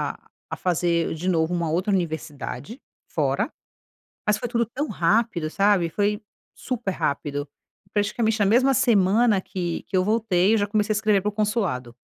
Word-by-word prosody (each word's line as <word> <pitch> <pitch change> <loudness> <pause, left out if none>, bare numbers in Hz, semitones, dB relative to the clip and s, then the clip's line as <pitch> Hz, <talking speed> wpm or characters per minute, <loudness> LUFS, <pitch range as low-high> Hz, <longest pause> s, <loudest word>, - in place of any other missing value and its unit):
a - - -25 0.2
a - - -2
fazer 170 -2 0
de 175 +4 -2
novo 165 0 +1
uma 170 -2 -1
outra 185 +5 0
universidade 160 - -4 0.3
fora, - - -1 0.7
mas 210 -1 +2
foi 245 - -3
tudo 235 0 +1
tão 270 +7 -4
rápido, 175 -3 +1
sabe. 195 -3 +2
Foi 205 +4 0 0.3
super 240 -6 -3
rápido. 145 -3 -2 0.4
Praticamente 220 +2 0
na 205 - +3
mesma 255 +6 +4
semana 220 -3 +3
que 175 -3 -4
que 190 - -1
eu 185 - +3
voltei 215 -2 +2
eu - - +3
já 205 - +1
comecei 210 0 0
a - - 0
escrever 210 -2 +3
pro 210 0 -1
consulado 200 - -1
200 Hz, 165 wpm, -24 LUFS, 170-220 Hz, 0.7 s, mesma